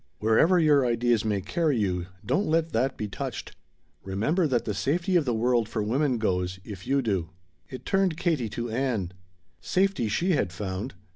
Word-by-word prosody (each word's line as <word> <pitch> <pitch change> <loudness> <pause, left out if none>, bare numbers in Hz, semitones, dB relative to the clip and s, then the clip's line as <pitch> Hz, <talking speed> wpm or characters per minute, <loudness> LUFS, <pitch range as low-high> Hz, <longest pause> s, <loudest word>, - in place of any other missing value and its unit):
Wherever 110 - +4
your 150 -4 +4
ideas 120 -2 +2
may 105 -3 0
carry 150 - 0
you, 90 -4 -1 0.2
don't 205 - +1
let 165 +1 +1
that 130 +4 0
be 105 - -3
touched. 100 - -6 0.5
Remember 130 - 0
that 125 -4 0
the 105 - -1
safety 170 - 0
of 165 -4 +3
the 125 - 0
world 120 -1 +1
for 110 - -2
women 130 +4 +1
goes, 90 -4 -1
if 100 -3 -9
you 140 0 +2
do." 95 -8 -1 0.4
It 130 -3 -9
turned 195 -4 +1
Katie 160 -10 0
to 120 +2 -4
Ann. 115 -7 -1 0.5
Safety 185 - +1
she 170 - 0
had 135 - +1
found. 95 +4 -5
120 Hz, 175 wpm, -27 LUFS, 105-155 Hz, 0.5 s, Wherever